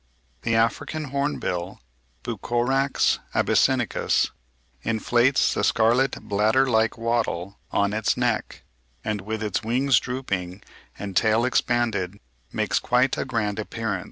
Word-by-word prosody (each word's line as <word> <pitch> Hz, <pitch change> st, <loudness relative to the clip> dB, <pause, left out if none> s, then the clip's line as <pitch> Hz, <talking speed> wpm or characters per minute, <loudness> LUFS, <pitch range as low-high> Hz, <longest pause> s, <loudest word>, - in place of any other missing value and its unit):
The 115 Hz, 0 st, 0 dB
African 130 Hz, +6 st, 0 dB
hornbill 120 Hz, -11 st, -2 dB, 0.4 s
(Bucorax 130 Hz, +3 st, +1 dB, 0.2 s
abyssinicus) -, -, +2 dB, 0.5 s
inflates 120 Hz, +3 st, +2 dB
the -, -, -1 dB
scarlet 125 Hz, +3 st, +2 dB
bladder 110 Hz, +6 st, +2 dB
like 110 Hz, -2 st, +2 dB
wattle 115 Hz, -5 st, -2 dB
on 100 Hz, 0 st, +1 dB
its 110 Hz, 0 st, 0 dB
neck, 120 Hz, -3 st, -1 dB, 0.4 s
and 105 Hz, -2 st, -2 dB
with 110 Hz, +2 st, -4 dB
its 105 Hz, -3 st, -1 dB
wings 125 Hz, +4 st, +2 dB
drooping 100 Hz, -8 st, -4 dB, 0.3 s
and 100 Hz, -2 st, -6 dB
tail 110 Hz, +3 st, +3 dB
expanded 110 Hz, -6 st, 0 dB, 0.3 s
"makes -, -, 0 dB
quite 125 Hz, +1 st, +2 dB
a -, -, -2 dB
grand 110 Hz, -5 st, -1 dB
appearance." 110 Hz, -2 st, -3 dB
115 Hz, 115 wpm, -24 LUFS, 105-125 Hz, 0.5 s, tail